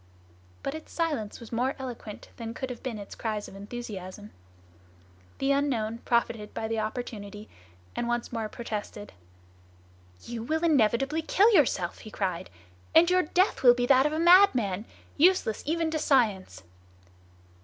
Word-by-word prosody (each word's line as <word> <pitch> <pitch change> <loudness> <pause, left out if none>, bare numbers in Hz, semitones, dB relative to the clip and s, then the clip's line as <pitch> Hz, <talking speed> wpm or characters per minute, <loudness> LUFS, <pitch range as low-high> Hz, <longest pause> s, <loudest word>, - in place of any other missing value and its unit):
But 275 - -2
its 315 0 -9
silence 295 -11 -2
was 235 - -12
more 250 +3 0
eloquent 245 -5 -8
than 230 0 -6
could 260 -1 -4
have 245 - -8
been 250 -5 -4
its 200 -1 -9
cries 215 -2 -4
of - - -12
enthusiasm. 205 -2 -8 1.1
The 270 +1 +1
unknown 240 -6 0
profited 235 -3 -1
by 220 - -2
the 225 0 -2
opportunity 215 -2 -5 0.5
and 240 - -2
once 240 0 -2
more 225 -2 -3
protested: 210 -3 -6 1.1
"You 235 -1 -6
will 315 +8 -2
inevitably 270 0 +2
kill 410 +7 +4
yourself!" 235 - +2
he 215 - -10
cried; 185 - -3 0.5
"and 340 +2 +6
your 365 0 +4
death 365 +4 +1
will 245 -2 +7
be 245 0 0
that 265 +2 +5
of - - -3
a - - -1
madman, 315 - +5 0.3
useless 335 - +3
even 325 0 0
to 315 - -1
science!" 225 -11 +1
240 Hz, 150 wpm, -28 LUFS, 215-295 Hz, 1.1 s, will